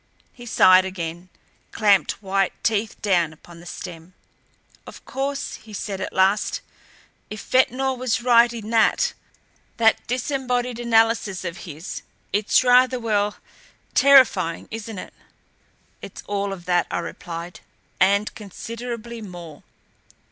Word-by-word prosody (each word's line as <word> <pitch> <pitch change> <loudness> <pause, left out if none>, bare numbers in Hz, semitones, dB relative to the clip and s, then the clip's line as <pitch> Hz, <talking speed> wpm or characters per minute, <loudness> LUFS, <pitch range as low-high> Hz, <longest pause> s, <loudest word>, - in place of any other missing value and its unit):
He 240 -1 -12
sighed 185 -4 +6
again, 175 -1 -6 0.4
clamped 205 -1 +2
white 195 -1 0
teeth 220 -1 0
down 175 -6 +2
upon 170 +2 -15
the 175 - -13
stem. 175 0 -9 0.7
"Of - - -12
course," 275 +1 -3
he 215 -1 -14
said 200 -1 -4
at - - -4
last, 190 +2 +1 0.7
"if 215 - -7
Ventnor 260 +1 +2
was 255 -2 -1
right 240 -1 +5
in 225 -2 -7
that 235 - +3 0.6
that 225 -1 +3
disembodied 250 -1 -2
analysis 225 -5 +2
of 170 0 -4
his, 155 +4 -7 0.3
it's 210 +4 +3
rather 250 0 +4
well, 210 -3 0 0.6
terrifying, 250 -12 +4
isn't 225 -1 -6
it?" - - -8 0.9
"It's - - -9
all 200 -1 -2
of 180 -3 -8
that," 175 0 +1
I - - -2
replied, 170 +1 -7 0.4
"and 200 +2 +3
considerably 230 +2 -7
more." 175 -6 -10
210 Hz, 125 wpm, -23 LUFS, 185-240 Hz, 0.9 s, sighed